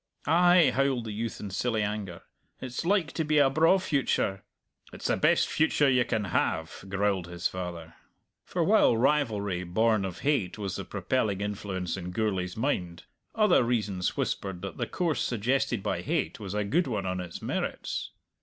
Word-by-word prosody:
"Ay," 175 -2 +5
howled 135 -2 +1
the 110 - -4
youth 110 +2 -4
in 100 - -6
silly 110 +2 0
anger, 100 -4 -4 0.4
"it's 125 +2 -4
like 180 -2 +1
to 160 - -1
be 155 0 +1
a 140 -2 +5
braw 165 +6 +5
future!" 135 - 0 0.5
"It's - - -10
the - - +2
best - - +3
future 155 -2 +2
you 125 -2 +3
can 110 -3 -1
have!" 80 -4 -1
growled 100 -2 0
his 85 0 -2
father. 85 -3 -6 0.5
For - - -1
while 115 - +4
rivalry, 110 -9 +1
born 110 +4 +2
of 95 -2 -5
hate, 135 -12 0
was 100 -3 -4
the - - -5
propelling 110 -7 -1
influence 95 -3 -3
in 90 -1 -5
Gourlay's 95 -2 -2
mind, 90 -9 -2 0.3
other 210 - +4
reasons 105 -6 -1
whispered 95 -2 -2
that 100 - -6
the - - -2
course 170 -5 -1
suggested 120 -1 0
by - - -1
hate 80 - -2
was 100 -2 -5
a 105 - +1
good 155 - +1
one 105 -6 -2
on 90 0 -2
its 90 -2 -7
merits. - - -3
105 Hz, 175 wpm, -28 LUFS, 95-135 Hz, 0.5 s, Ay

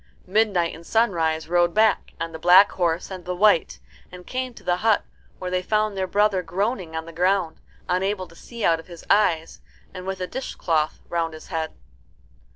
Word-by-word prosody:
Midnight 190 -4 +1
and 165 - -11
Sunrise 165 -7 +1
rode 175 0 +2
back, 215 -1 +2
on 165 0 -3
the 160 - -8
black 180 +4 +7
horse 175 0 -1
and 185 -1 -7
the 180 +1 -3
white, 205 -3 +3 0.3
and 180 0 -11
came 255 0 -3
to - - -14
the 175 0 +1
hut, 220 +2 +2 0.3
where 180 0 -5
they 180 0 +1
found 215 +1 0
their 190 -1 -1
brother 205 0 +2
groaning 185 0 -2
on 160 0 -3
the 165 - -10
ground, 180 0 0 0.3
unable 185 +1 -1
to 165 - -18
see 235 +4 -6
out 165 -1 +3
of 165 - -13
his 170 -2 -12
eyes, 165 -6 +2 0.3
and 185 0 -8
with 190 0 -3
a 185 - -2
dishcloth 165 -9 -2
round 165 -2 -2
his 155 - -12
head. 160 -3 -3
180 Hz, 190 wpm, -24 LUFS, 165-200 Hz, 0.3 s, black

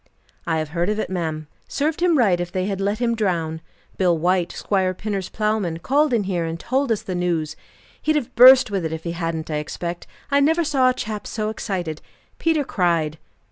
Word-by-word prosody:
"I 165 -1 +1
have 155 -1 -2
heard 170 +4 -1
of 210 - 0
it, 215 - -3
ma'am. 160 -4 -3 0.2
Served 305 +3 -1
him 350 -3 +4
right, 195 -9 +3
if 175 0 -3
they 185 0 -1
had 195 -1 -3
let 200 +2 0
him 235 0 0
drown! 170 -7 -1 0.4
Bill 180 -3 +3
White, 180 +1 +1
Squire 185 -2 0
Pinner's 200 -2 -4
plowman, 210 -6 -1
called 285 - +2
in 230 -4 +2
here 185 -3 -1
and 165 0 -4
told 265 +4 0
us 220 - 0
the 185 - -4
news. 170 -4 -1 0.5
He'd 310 - +1
have 290 -6 -2
burst 255 -2 +8
with 195 -3 -1
it, 160 - -2
if 160 0 -6
he 170 - -3
hadn't, 165 -2 -3
I 150 - 0
expect; 170 +3 -5 0.2
I 280 - +4
never 320 +4 +3
saw 275 -5 +3
a - - +2
chap 210 -1 -5
so 215 -1 -2
excited. 180 -8 -4 0.4
Peter 320 -3 +2
cried." 170 - 0
190 Hz, 210 wpm, -22 LUFS, 170-235 Hz, 0.5 s, burst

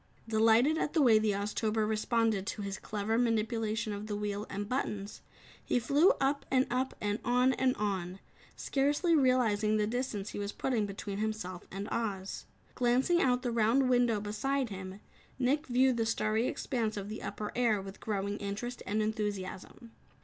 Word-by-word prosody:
Delighted 225 +7 +4
at - - -1
the 325 - +3
way 225 -4 +6
the 215 -1 +1
Oztober 210 +2 -1
responded 220 -2 +1
to 210 - -3
his 195 -1 -4
clever 215 +2 -1
manipulation 225 -1 0
of 205 +1 -6
the 210 - -3
wheel 205 0 -3
and 205 +1 -4
buttons, 210 -5 -3 0.4
he - - +1
flew 285 - +4
up 275 +1 +1
and 260 0 +3
up 255 +2 -1
and 205 +1 -1
on 250 +2 +3
and 260 -1 +1
on, 190 -3 -2 0.4
scarcely 290 +5 +1
realizing 225 -6 +3
the 210 - +2
distance 220 -3 -3
he - - -6
was 200 0 -3
putting 230 -6 0
between 200 0 -5
himself 215 -5 -4
and 195 +2 -5
Oz. 200 -4 -3 0.3
Glancing 255 +8 +2
out 250 -1 +2
the 245 - -1
round 235 +4 +3
window 245 -3 +3
beside 235 +6 -1
him, 190 0 -7 0.4
Nick 275 +4 +1
viewed 255 0 +3
the 225 - +1
starry 220 +1 +1
expanse 230 -6 -2
of 200 -1 -4
the 215 +1 -6
upper 210 - -5
air 235 -4 +2
with 195 0 -9
growing 205 -1 -2
interest 210 +5 -4
and 215 +1 +1
enthusiasm. 210 +1 -4
220 Hz, 170 wpm, -31 LUFS, 205-250 Hz, 0.4 s, way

